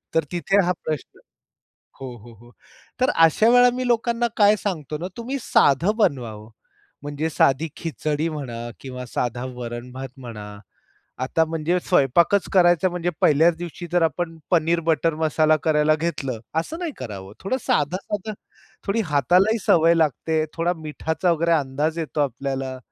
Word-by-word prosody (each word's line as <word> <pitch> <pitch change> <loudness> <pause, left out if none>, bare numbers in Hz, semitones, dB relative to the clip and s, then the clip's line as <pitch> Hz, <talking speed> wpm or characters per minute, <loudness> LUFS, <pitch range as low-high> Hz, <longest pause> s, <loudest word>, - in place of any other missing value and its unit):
तर 160 - +3
तिथे 195 +3 +2
हा 180 - +2
प्रश्न 155 -4 -5 0.8
हो, 125 -2 -6
हो, 115 +2 -14
हो. 120 +2 -18 0.5
तर 255 - +3 0.2
अशा 215 +8 +3
वेळा 245 0 +6
मी 255 0 -2
लोकांना 235 0 +1
काय 205 0 +6
सांगतो 155 -8 -4
ना, 175 +4 -5
तुम्ही 255 +4 -3
साधं 170 - +3
बनवावं 115 - -1 0.5
म्हणजे 145 +2 -3
साधी 145 +1 +2
खिचडी 155 -1 -2
म्हणा 120 -6 -6
किंवा 125 -1 -7
साधा 120 0 -3
वरण-भात 125 +2 -7
म्हणा. 105 -5 -9 0.6
आता 160 +5 +1
म्हणजे 165 +2 -1
स्वयंपाकच 170 +4 +2
करायचा 175 -1 +4
म्हणजे 175 0 -2
पहिल्याच 160 +3 +4
दिवशी 175 0 -7
जर 175 -1 +2
आपण 165 +1 -2
पनीर 170 0 +3
बटर 165 0 +2
मसाला 155 0 +2
करायला 155 -1 +3
घेतलं, 145 -7 -3 0.2
असं 320 - -5
नाही 345 -3 -3
करावं. 100 -5 -8
थोडं 225 +7 -2
साधं-साधं, 205 - -1 0.5
थोडी 220 +3 +1
हातालाही 180 - +3
सवय 165 0 +5
लागते. 160 +1 +1
थोडा 170 +1 0
मिठाचा 160 +2 -2
वगैरे 170 +1 +1
अंदाज 150 +4 -2
येतो 155 -1 -4
आपल्याला 135 0 -3
160 Hz, 145 wpm, -23 LUFS, 135-180 Hz, 0.8 s, वेळा